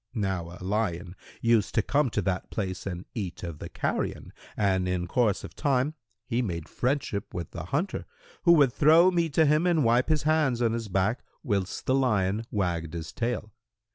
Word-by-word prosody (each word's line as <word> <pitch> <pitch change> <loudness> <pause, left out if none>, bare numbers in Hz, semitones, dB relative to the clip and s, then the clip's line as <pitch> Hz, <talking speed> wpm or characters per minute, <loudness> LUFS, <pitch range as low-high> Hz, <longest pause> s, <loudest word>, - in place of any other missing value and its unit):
Now 95 -5 -2
a - - -9
lion 95 -3 -2 0.3
used 115 -3 +2
to 110 - +3
come 145 +2 +2
to 105 -2 -1
that 95 0 -2
place 95 -3 -4
and 90 -1 -5
eat 95 -7 -5
of 85 -4 -6
the - - -7
carrion; - - -3 0.2
and 95 -3 +1
in 90 -1 -1
course 105 +2 +1
of - - -9
time, 140 +1 +1 0.3
he 120 +2 0
made 85 -8 -3
friendship 125 -4 -2
with 85 -3 -5
the 85 -1 -6
hunter, 150 - -2 0.4
who 170 - +6
would 140 -7 +5
throw 165 +5 +6
meat 170 -4 0
to 160 - +5
him 155 +4 +3
and 165 -4 +3
wipe 120 +3 +3
his 155 -1 +2
hands 155 -6 +2
on 115 -2 +2
his 115 -1 -3
back, 95 +5 0 0.2
whilst 100 -4 -2
the 130 - +2
lion 110 -5 +1
wagged 85 -5 -2
his 80 -1 -6
tail. 115 -2 -2
110 Hz, 190 wpm, -27 LUFS, 95-135 Hz, 0.4 s, who